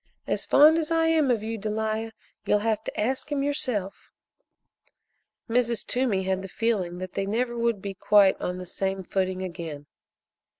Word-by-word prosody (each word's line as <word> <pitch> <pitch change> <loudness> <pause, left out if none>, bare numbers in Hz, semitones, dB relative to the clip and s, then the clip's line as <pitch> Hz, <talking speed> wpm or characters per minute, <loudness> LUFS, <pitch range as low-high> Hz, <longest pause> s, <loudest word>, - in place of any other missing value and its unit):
As - - -2
fond 310 +3 +7
as 315 -1 -2
I 325 0 +2
am 315 -4 +3
of 230 -4 +1
you, 225 0 -4
Delia, 220 +1 -2 0.3
you'll 210 - +3
have 220 -1 0
to - - -5
ask 260 +6 -1
him 280 -1 0
yourself." 245 -9 -2 1.4
Mrs. 235 -2 +1
Toomey 240 -7 0
had 190 0 -1
the 195 - -8
feeling 195 -5 -1
that 185 0 -6
they 195 - -2
never 240 +3 -1
would 235 -3 0
be 200 -1 -4
quite 200 0 +4
on 180 0 -2
the 185 - -7
same 190 +1 -2
footing 185 0 -1
again. 165 -5 -6
215 Hz, 170 wpm, -26 LUFS, 190-240 Hz, 1.4 s, fond